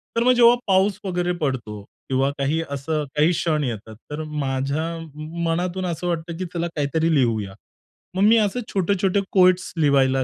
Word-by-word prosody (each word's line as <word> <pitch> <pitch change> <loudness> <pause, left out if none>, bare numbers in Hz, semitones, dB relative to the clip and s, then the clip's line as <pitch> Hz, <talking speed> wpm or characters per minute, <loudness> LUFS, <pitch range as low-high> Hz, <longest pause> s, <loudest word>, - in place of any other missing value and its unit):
तर 230 - +2
मग 255 - +5
जेव्हा 240 0 +6
पाऊस 195 +1 +2
वगैरे 180 -1 -1
पडतो 115 -7 -3 0.3
किंवा 135 +1 +2
काही 145 +4 0
असं 150 +2 -2
काही 155 +4 +4
क्षण 155 -3 0
येतात, 110 -3 -5 0.2
तर 155 +1 -4
माझ्या 140 0 -2 0.6
मनातून 180 +3 -1
असं 175 0 -3
वाटतं 170 -1 -3
की 185 - -3
चला 170 0 -1
काहीतरी 160 +3 +1
लिहूया. 110 -7 +1 0.6
मग 190 - 0
मी 230 +1 +6
असे 215 +3 +1
छोटे-छोटे 195 +1 +1
कोएट्स 185 -1 +4
लिहायला 135 -3 +3
160 Hz, 160 wpm, -22 LUFS, 140-185 Hz, 0.6 s, जेव्हा